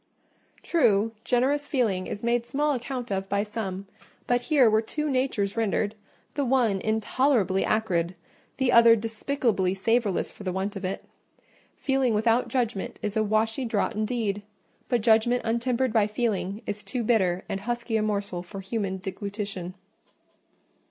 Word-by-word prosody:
True, 225 - +3
generous 275 +4 +1
feeling 210 -9 0
is 205 - -6
made 235 0 +1
small 290 +4 0
account 250 -2 -4
of 195 0 -2
by 200 0 +1
some, 200 -3 -5 0.4
but 245 0 +2
here 270 -2 +4
were 220 0 +4
two 300 +7 -3
natures 255 -7 0
rendered, 215 -2 0 0.4
the 285 - -1
one 240 -7 +2
intolerably 220 -2 +1
acrid, 185 -5 0 0.4
the 265 -2 +2
other 235 -1 +8
despicably 225 -3 0
savourless 220 0 +1
for - - -12
the 185 - -2
want 190 +3 -3
of 195 - -6
it. 185 +1 -3 0.7
Feeling 270 -4 +1
without 225 +3 +2
judgment 235 -6 -2
is 210 -1 -2
a 220 - +3
washy 220 +4 +1
draught 225 -4 0
indeed; 215 -2 -1 0.5
but 245 -3 +2
judgment 230 +2 +3
untempered 235 +1 0
by 215 -3 +4
feeling 210 -2 -2
is 205 0 -4
too 210 +4 -3
bitter 190 -6 +2
and 195 - -3
husky 235 +2 -3
a 220 - +2
morsel 200 -4 -2
for 190 +3 -9
human 195 -1 -2
deglutition. 195 -1 -5
220 Hz, 150 wpm, -26 LUFS, 200-245 Hz, 0.7 s, other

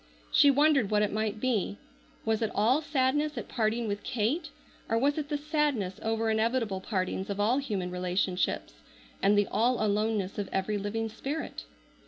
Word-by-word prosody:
She 285 - +6
wondered 280 -5 +4
what 210 -1 +3
it 205 - -1
might 215 0 -1
be. 215 -5 0 0.5
Was 220 0 +1
it 220 - +1
all 240 +8 +3
sadness 295 0 0
at - - -4
parting 225 +1 0
with 205 0 -2
Kate, 250 +9 -1 0.4
or 225 - +2
was 285 +5 +2
it 290 -1 -5
the 295 - 0
sadness 290 - -1
over 225 0 0
inevitable 220 -3 0
partings 190 -1 -2
of 200 0 -3
all 230 +6 +3
human 200 -10 -3
relationships, 180 - -1 0.5
and 205 +1 +4
the 205 - +4
all 240 +2 +2
aloneness 210 -1 0
of 200 - -3
every 205 +2 -1
living 220 +3 -2
spirit? 275 +8 -5
220 Hz, 170 wpm, -29 LUFS, 205-260 Hz, 0.5 s, She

